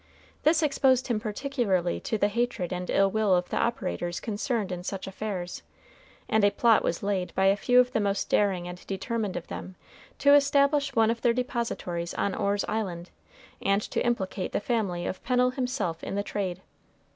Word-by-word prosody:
This 320 +1 +3
exposed 265 -3 +2
him 230 -3 +1
particularly 210 -6 -1
to 220 - -2
the 205 - +3
hatred 230 -4 -1
and 180 0 -4
ill 195 0 +3
will 215 -3 +3
of 180 0 -1
the - - -2
operators 180 -6 -1
concerned 215 -1 -2
in 180 -1 -4
such 190 +1 -4
affairs, 190 -2 -5 0.7
and 220 -1 +2
a 205 - +6
plot 225 +2 +3
was 170 - -1
laid 195 -3 -1
by 190 - +2
a 195 +1 +5
few 245 +4 +4
of 250 0 +4
the 225 - +1
most 200 -1 0
daring 190 -4 +1
and 180 0 -8
determined 205 +1 -2
of 170 - -6
them 185 - -7 0.4
to 285 0 +5
establish 280 0 +3
one 225 -1 +4
of 230 0 -4
their 240 -2 +3
depositories 230 -9 -3
on 200 - 0
Orr's 200 0 0
Island, 185 -5 -3 0.5
and 195 +1 +2
to - - -2
implicate 195 -6 -2
the - - +1
family 200 -6 -1
of 185 - -4
Pennel 250 0 +2
himself 250 -11 -2
in - - -4
the 200 - 0
trade. 190 -3 -3
205 Hz, 185 wpm, -27 LUFS, 185-240 Hz, 0.7 s, a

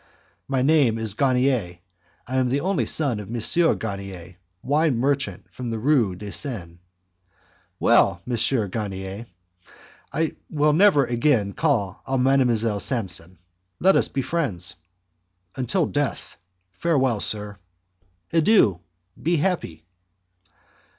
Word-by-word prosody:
"My 135 -2 0
name 140 -6 +3
is 110 -3 -1
Garnier, 125 -7 +1 0.5
I 130 +2 -3
am 130 -1 +1
the 140 +3 0
only 175 - 0
son 135 -9 +1
of 105 - -9
M. 140 +9 +3
Garnier, 95 -4 -7 0.3
wine 145 -1 +1
merchant 140 +3 -1
in 125 -2 -4
the 115 - -3
Rue 115 -6 +2
de 100 +2 -8
Seine." 90 - -2 1.0
"Well, 85 - +3
M. 120 -2 0
Garnier, 100 +1 -5 0.8
I 160 0 -2
will 150 -1 +2
never 165 -5 +5
again 120 -4 +1
call 115 - -1
on 130 -1 0
Mdlle. 120 -6 +2
Samson. 95 -7 -2 0.4
Let 190 +2 +4
us - - +4
be 135 - -3
friends." 100 - -1 0.8
"Until 155 +7 0
death. 145 -2 -3 0.4
Farewell, 130 - 0
sir." 105 -1 0 0.7
"Adieu, 160 - +4 0.4
be 170 +2 +1
happy!" 145 - -2
125 Hz, 115 wpm, -23 LUFS, 100-145 Hz, 1.0 s, never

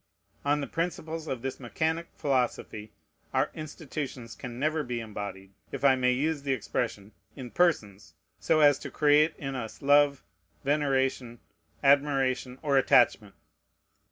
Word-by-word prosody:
On 145 +1 +1
the - - -2
principles 165 -1 -4
of 130 -4 -4
this 135 - -4
mechanic 160 +6 -2
philosophy, 120 -5 -2 0.4
our - - +2
institutions 145 -6 -6
can 120 +3 -8
never 155 +3 0
be 125 -4 -4
embodied, 100 -3 -7 0.2
if - - -3
I 135 -1 +6
may 125 -1 +2
use 145 +4 0
the 140 -1 0
expression, 110 -3 -3 0.2
in 125 -4 -8
persons, 105 - 0 0.2
so 155 -1 +2
as 145 -2 +6
to - - -7
create 150 +1 +3
in 135 -1 -5
us 115 -4 -6
love, 145 0 +4 0.4
veneration, 135 -4 0 0.5
admiration, 135 -3 +2
or 140 -2 +3
attachment. 110 -6 +3
135 Hz, 135 wpm, -28 LUFS, 120-150 Hz, 0.5 s, I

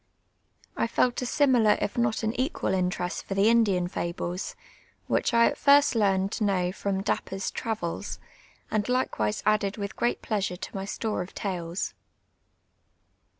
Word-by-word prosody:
I - - +1
felt 245 +2 +1
a 250 - -2
similar 245 -7 +4
if 205 - -2
not 230 -2 0
an 220 +1 0
equal 260 - -1
interest 180 -1 -1
for 195 - -4
the 200 +3 +4
Indian 200 -6 +3
fables, 175 +1 -4 0.5
which - - +1
I 235 0 +5
at - - +1
tirst 285 0 +6
learned 195 -3 +2
to 220 - -2
know 185 -3 +1
from 195 0 -2
I)apj)er's 195 -1 -2
IruvfLs, 205 -4 -3 0.5
and 215 +1 0
likewise 110 - 0
added 210 -1 +2
with 200 -1 -4
«;reat 240 - +1
pleasure 200 -4 -1
to - - -8
my 195 0 -3
store 210 0 -2
of 180 - -8
tales. 175 -2 -3
205 Hz, 150 wpm, -27 LUFS, 185-230 Hz, 0.5 s, tirst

